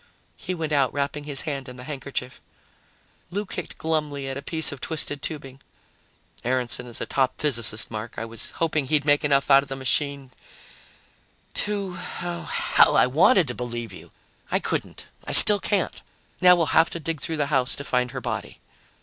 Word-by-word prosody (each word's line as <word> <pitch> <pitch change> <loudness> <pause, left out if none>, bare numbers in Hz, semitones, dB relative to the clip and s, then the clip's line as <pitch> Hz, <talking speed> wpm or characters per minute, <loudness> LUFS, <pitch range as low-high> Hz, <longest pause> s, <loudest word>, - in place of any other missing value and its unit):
He 185 -1 -5
went 160 -2 -4
out, 140 -3 +2
wrapping 145 +1 -3
his 145 -2 0
hand 140 -4 -5
in 125 - -10
the 125 - -10
handkerchief. 135 -2 -6 0.9
Lou 200 +4 -3
kicked 180 -2 -6
glumly 150 -3 -2
at 135 - -4
a 140 - -6
piece 160 +2 +1
of 140 - -9
twisted 150 -3 0
tubing. 135 -3 -7 0.8
"Aaronson 125 0 -1
is 120 - -7
a - - -1
top 130 -1 -1
physicist, 115 -7 +2
Mark. 110 +1 -6
I 115 - -4
was 115 -1 -4
hoping 155 -4 -1
he'd 150 0 +1
make 145 0 +3
enough 140 -1 +1
out 135 0 +7
of 140 - -11
the 135 - -4
machine 135 0 -1 1.2
to 200 -4 -2
ah, 175 -1 -6
hell, - - +3
I - - +5
wanted 165 - +4
to - - -3
believe 120 -1 -6
you! - - -12 0.4
I - - +1
couldn't. - - -4 0.2
I - - -4
still 210 -1 +10
can't. 195 -2 -2 0.4
Now 180 -1 +7
we'll 165 -4 -1
have 165 - +4
to 170 - -6
dig 165 -1 -5
through 160 - -4
the 145 0 -2
house 130 -1 +2
to 140 - -6
find 125 -3 -1
her 130 +1 -6
body." 110 -4 -5
140 Hz, 185 wpm, -24 LUFS, 130-160 Hz, 1.2 s, still